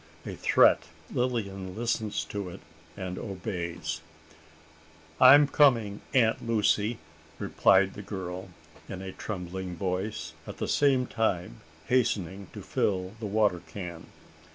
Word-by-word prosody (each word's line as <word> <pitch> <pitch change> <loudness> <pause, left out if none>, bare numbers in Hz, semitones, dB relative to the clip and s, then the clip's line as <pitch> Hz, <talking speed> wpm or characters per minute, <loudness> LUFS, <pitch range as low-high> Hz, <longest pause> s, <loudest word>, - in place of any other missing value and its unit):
A - - -5
threat! - - +4 0.3
Lilian 100 -7 -2
listens 110 -2 -1
to 100 -3 -5
it, - - -10 0.4
and 95 -2 -4
obeys! 85 -5 -4 1.2
"I 130 +2 +10
am 145 0 +5
coming, 115 -9 +3
Aunt 115 -5 +3
Lucy!" 110 -1 +1 0.4
replied 95 0 +3
the 105 - -8
girl, 95 -2 -6 0.4
in 95 -1 -6
a 95 - -5
trembling 90 -2 -5
voice, 95 +3 -3
at - - -7
the - - -2
same 135 -3 +3
time 90 - -1 0.2
hastening 100 -6 0
to - - -8
fill 95 -1 -1
the 110 - -4
water 105 -4 +2
can. 85 -4 -7
100 Hz, 125 wpm, -28 LUFS, 90-115 Hz, 1.2 s, I